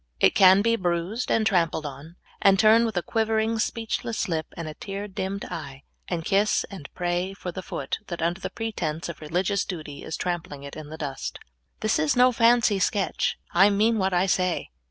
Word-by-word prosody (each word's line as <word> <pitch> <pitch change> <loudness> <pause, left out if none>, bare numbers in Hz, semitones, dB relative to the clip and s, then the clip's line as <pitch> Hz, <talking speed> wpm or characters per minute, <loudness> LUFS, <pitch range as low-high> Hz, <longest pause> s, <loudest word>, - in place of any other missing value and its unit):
It - - +5
can 190 +1 +7
be 230 +1 +3
bruised 180 +4 -2
and 220 - +2
trampled 165 -6 +1
on, 145 +4 -8 0.3
and 195 -1 +5
turn 220 +3 +6
wdth 215 -5 -4
a 175 - 0
quivering, 220 0 0
speechless 225 0 -2
lip, 160 -3 -2
and 165 -2 -5
a 155 - -5
tear 200 +4 -6
dimmed 195 0 -4
eye, 135 -1 -7 0.2
and 165 -3 -3
kiss 200 +2 +2
and 175 -8 -9
pray 180 +2 -1
for 180 -2 -6
the 185 - -6
foot 140 -6 -4
that, 175 - -5
under 170 +3 0
the - - -3
pretense 175 -9 -3
of 170 - -8
religious 180 +6 0
duty, 155 -6 -7
is 160 - -4
trampling 175 -5 -4
it 140 - -8
in 155 -1 -8
the 160 - -8
dust. 140 -4 -5 0.4
This 215 0 +1
is 155 -1 +2
no 250 +1 +6
fancy 230 -3 +4
sketch; 195 +1 0 0.2
I 195 +4 +6
mean 215 +2 +2
what 190 0 +1
I 180 +1 +2
say. 185 - 0
185 Hz, 195 wpm, -25 LUFS, 165-215 Hz, 0.4 s, can